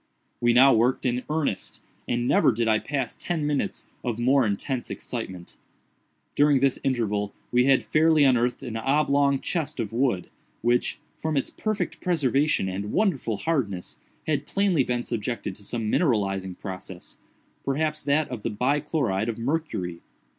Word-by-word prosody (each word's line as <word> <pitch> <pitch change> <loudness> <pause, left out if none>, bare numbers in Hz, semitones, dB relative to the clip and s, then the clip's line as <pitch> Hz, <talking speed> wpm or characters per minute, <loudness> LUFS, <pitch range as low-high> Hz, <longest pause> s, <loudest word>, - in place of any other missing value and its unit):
We 120 0 +3
now 130 +3 +7
worked 120 +4 +2
in 125 0 +1
earnest, 150 -11 -2 0.3
and 120 0 0
never - - +4
did 115 0 -1
I 110 -1 +3
pass 135 -4 -3
ten 165 -4 -2
minutes 145 -2 -1 0.2
of 120 -3 -2
more 130 +1 +3
intense 120 +5 -2
excitement. 95 -8 -6 0.8
During 145 -1 +4
this 135 0 +2
interval 105 -6 -1 0.2
we 125 +1 +4
had 135 -1 +4
fairly 155 -1 +4
unearthed 125 -2 +2
an 115 -3 -4
oblong 140 +2 +2
chest 155 -4 -2
of 110 -1 -3
wood, 120 -7 +1 0.4
which, 120 +1 +1 0.2
from 160 -2 -1
its 135 - -1
perfect 215 -1 -3
preservation 150 - +2
and 100 +2 -4
wonderful 140 - +1
hardness, 105 - -2 0.3
had 145 -2 -1
plainly 195 -8 +2
been 120 -1 -1
subjected 115 -3 -3
to 100 - -13
some 110 0 -2
mineralizing 95 - +1
process—perhaps 135 - -5
that 145 +2 +1
of 125 -4 -5
the - - -2
bi 125 +7 +1
chloride 120 - -1
of 115 - -3
mercury. 115 - -2
125 Hz, 150 wpm, -26 LUFS, 110-145 Hz, 0.8 s, now